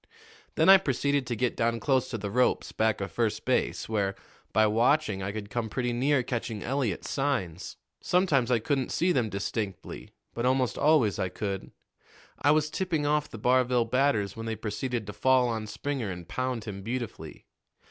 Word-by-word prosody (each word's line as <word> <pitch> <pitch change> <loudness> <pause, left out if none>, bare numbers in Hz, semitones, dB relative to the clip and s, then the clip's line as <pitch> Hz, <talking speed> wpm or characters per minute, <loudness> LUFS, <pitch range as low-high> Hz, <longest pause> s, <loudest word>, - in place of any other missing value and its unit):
Then - - +3
I 195 0 +10
proceeded 140 -5 0
to 120 - -2
get 125 +1 0
down 115 0 0
close 130 -1 +1
to 115 - -3
the 100 -1 -5
ropes 125 +3 +1
back 110 -2 0
of 100 - -4
first 115 -3 -1
base, - - 0
where, 100 -3 -1 0.4
by 110 - +4
watching, 115 0 +2
I 95 +1 -3
could 105 -1 -7
come 115 0 -2
pretty 125 +1 -1
near 135 +2 +2
catching 115 -4 -4
Eliot's 130 -7 -2
signs. 125 - -2 0.2
Sometimes 155 -9 +2
I 125 - +4
couldn't 130 +3 -1
see 180 +2 +2
them 125 -8 +1
distinctly, 100 0 -4 0.2
but 120 - -3
almost 130 -1 +1
always 145 -10 +3
I 95 - 0
could. 95 +1 -4 0.7
I - - +3
was 150 0 +3
tipping 165 -4 -1
off 150 0 +1
the - - -8
Barville 125 +1 +2
batters 115 -5 +1
when 115 0 -6
they 110 - -2
proceeded 115 +2 -3
to 105 - -7
fall 130 +4 +3
on 110 -2 -3
Springer 130 0 -3
and 90 -2 -7
pound 130 -1 -2
him 100 -3 -6
beautifully. 120 +2 -6
120 Hz, 180 wpm, -28 LUFS, 105-135 Hz, 0.7 s, I